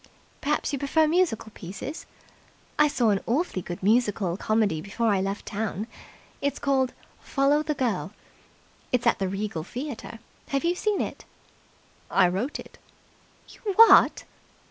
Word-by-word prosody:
"Perhaps 295 0 -1
you 280 - -1
prefer 310 +3 +2
musical 320 -10 +1
pieces? 200 - -7 0.7
I 300 - +7
saw 240 -6 +2
an 200 - +2
awfully 255 - 0
good 175 +1 -7
musical 210 -4 +2
comedy 210 -6 +1
before 215 +5 -1
I 200 -2 +2
left 195 +1 -3
town. 210 0 -3 0.6
It's 280 0 -1
called 265 -2 +1 0.3
'Follow 280 +2 +2
the 305 -1 -2
Girl'. 225 -8 -1 0.8
It's 250 -1 +1
at 235 - +3
the 195 - 0
Regal 195 -4 -3
Theatre. 245 - -6 0.3
Have 275 -1 -1
you 340 +1 +2
seen 415 +3 0
it?" - - -5 0.8
"I 190 -2 +4
wrote 195 +11 -2
it." - - -12 0.7
"You - - -15 0.2
what!" 455 +2 +7
230 Hz, 145 wpm, -26 LUFS, 200-285 Hz, 0.8 s, I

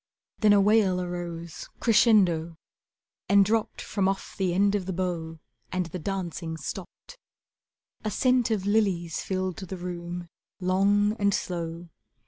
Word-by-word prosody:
Then 215 -2 +5
a 205 - +6
wail 200 -2 +4
arose 175 -2 -5
crescendo 185 -8 +3 0.7
And 200 0 +6
dropped 220 +2 0
from 195 -3 0
off 195 0 -3
the 190 -3 0
end 200 +3 +3
of 195 -3 -1
the 190 - -2
bow, 170 -3 -3 0.3
And 185 -1 -1
the 170 +2 -6
dancing 170 -3 -4
stopped. - - -8 0.8
A 215 - -1
scent 250 +2 +2
of 210 -4 -1
lilies 195 -6 +1
filled 185 -1 -2
the 190 -1 -6
room, 175 0 -5 0.3
Long 200 +3 +2
and 200 -1 +3
slow. 170 -1 -4
185 Hz, 135 wpm, -27 LUFS, 175-205 Hz, 0.8 s, a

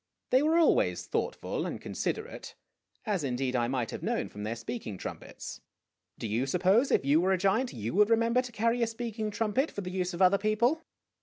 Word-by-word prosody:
They 255 - +5
were 315 +3 +3
always 340 +9 +3
thoughtful - - -2
and - - -5
considerate, 445 +3 -4 0.5
as, 200 -7 0
indeed, 130 -1 -1
I 120 -1 +2
might 125 -2 -1
have - - -6
known - - -1
from 105 - -9
their 110 +2 -2
speaking 115 -3 -6
trumpets. - - -7 0.6
Do - - -5
you 115 +6 0
suppose, 190 - +3
if - - +2
you 145 +4 +4
were 190 +2 +3
a - - +2
giant, 200 +7 +1
you 110 -1 -4
would 210 +3 +4
remember 230 +2 +3
to 250 -1 -8
carry 230 +2 +1
a 230 - +3
speaking 225 -1 -4
trumpet 225 +7 0
for 205 - -5
the 180 -1 -5
use 180 -1 -2
of 175 - -5
other 190 +2 +5
people? 235 +9 +2
200 Hz, 205 wpm, -30 LUFS, -, 0.6 s, They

